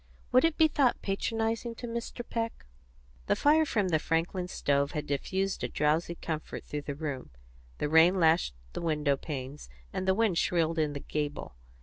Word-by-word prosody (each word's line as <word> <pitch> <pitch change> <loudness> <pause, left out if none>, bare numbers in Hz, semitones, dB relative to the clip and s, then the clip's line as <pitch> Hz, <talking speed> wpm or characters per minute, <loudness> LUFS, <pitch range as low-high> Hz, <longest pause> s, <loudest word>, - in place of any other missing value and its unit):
Would 255 - +5
it 330 -1 +2
be 320 - +6
thought 275 -5 +2
patronising 225 +3 -1
to 240 - -7
Mr. 235 +1 -5
Peck? 230 - -3 0.6
The - - +3
fire 310 +2 +4
from 205 -8 +1
the 160 -2 +2
Franklin 170 +3 -1
stove 140 -5 0
diffused 155 +7 -2
a - - +1
drowsy 155 +3 0
comfort 155 -2 -5
through 150 - -4
the 145 -1 -5
room, 140 - -5 0.5
the - - -1
rain 165 +5 +5
lashed 160 - +3 0.2
the - - -4
window 150 -4 +1
panes, 135 - -6 0.2
and 185 - -3
the 190 - +4
wind 210 -6 +2
shrilled 165 -1 +1
in 150 -2 +1
the 140 - -5
gable. 145 - -4
165 Hz, 170 wpm, -30 LUFS, 150-225 Hz, 0.6 s, be